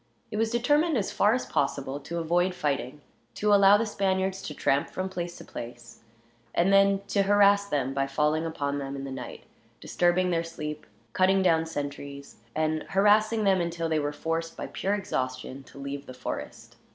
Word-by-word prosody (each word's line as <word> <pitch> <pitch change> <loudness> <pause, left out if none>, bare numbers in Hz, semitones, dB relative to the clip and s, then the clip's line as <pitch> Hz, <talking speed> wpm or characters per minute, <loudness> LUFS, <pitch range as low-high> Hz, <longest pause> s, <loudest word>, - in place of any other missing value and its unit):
It 210 - -3
was 225 +1 +1
determined 290 +6 +2
as 205 - -1
far 210 +3 +3
as 255 - -2
possible 140 0 -1
to 165 +4 -6
avoid 175 +2 +1
fighting, 145 -3 -2 0.3
to 210 0 +2
allow 200 0 +7
the 230 - 0
Spaniards 190 -2 -1
to 150 - -6
tramp 140 +1 +1
from 185 0 -3
place 175 -2 -5
to - - -11
place, 120 0 -9 0.6
and 180 +3 +3
then 195 0 +5
to 200 - +2
harass 200 0 +4
them 135 -6 -1
by 135 0 0
falling 150 +3 +1
upon 145 -3 -2
them 135 0 -5
in 135 - -5
the 135 - -6
night, 125 -2 -7 0.4
disturbing 180 +1 +1
their 165 -1 +1
sleep, 150 -2 -6 0.3
cutting 190 +1 +3
down 165 -2 +3
sentries; 140 -2 -6 0.2
and 155 0 0
harassing 215 +3 +3
them 190 -2 +3
until 170 -1 -2
they 160 -1 +1
were 145 0 -1
forced, 165 +2 -3
by - - -4
pure 200 +2 -1
exhaustion, 130 -8 -3
to - - -16
leave 140 0 -6
the 130 - -9
forest. 125 - -7
165 Hz, 185 wpm, -27 LUFS, 140-195 Hz, 0.6 s, allow